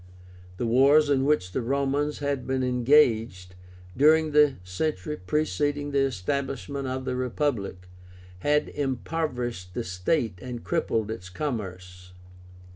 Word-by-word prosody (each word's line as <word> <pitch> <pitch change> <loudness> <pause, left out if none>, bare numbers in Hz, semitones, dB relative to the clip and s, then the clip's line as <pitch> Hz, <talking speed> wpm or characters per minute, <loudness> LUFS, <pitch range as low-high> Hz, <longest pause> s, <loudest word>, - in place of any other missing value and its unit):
The 120 - -2
wars 140 +5 +5
in 135 -1 +2
which 140 -12 +1
the 130 - -1
Romans 140 +4 0
had 140 -2 -2
been 130 0 0
engaged, 120 -7 +2 0.4
during 155 +3 +4
the 150 -2 +5
century 150 - -3
preceding 145 +4 -1
the 140 - +2
establishment 135 +3 -2
of 130 0 -3
the 130 -1 -2
Republic, 120 -8 -2 0.5
had 150 +8 +1
impoverished 125 - -3
the 120 - -2
state 90 - -1
and 125 0 -6
crippled 115 -10 -1
its 95 -5 -7
commerce. 90 -7 -6
130 Hz, 120 wpm, -26 LUFS, 110-145 Hz, 0.5 s, wars